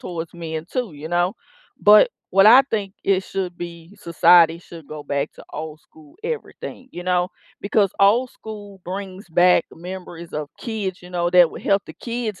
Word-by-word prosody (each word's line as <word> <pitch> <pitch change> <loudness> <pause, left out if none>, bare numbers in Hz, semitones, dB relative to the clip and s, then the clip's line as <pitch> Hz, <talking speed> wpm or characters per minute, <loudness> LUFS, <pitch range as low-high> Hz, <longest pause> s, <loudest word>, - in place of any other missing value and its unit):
towards 170 -1 -6
men 160 -1 -5
too, 245 -8 -2
you 150 +1 -9
know, 175 +3 0 0.5
but 210 0 +7 0.2
what 195 +2 +6
I 250 +5 +9
think 205 -7 -3
it 195 -1 +2
should 185 -2 -4
be 170 +1 -9
Society 170 -2 +5
should 170 -3 -13
go 150 -1 -8
back 140 +1 -2 0.2
old 155 0 -6
school 310 - -20
everything, 455 - -6
you 175 -5 -8
know? 180 0 +1 0.3
Because 200 -1 +1
old 230 +6 +4
school 205 -3 -10
brings 190 +1 -7
back 175 +2 +4
memories 175 -1 -9
of 150 -1 -4
kids, 205 -6 -4
you 180 - -13
know, 175 -1 0
that 180 -1 +6
would - - -10
help 195 0 +2
the - - -9
kids 230 -5 -5
180 Hz, 175 wpm, -22 LUFS, 170-205 Hz, 0.5 s, I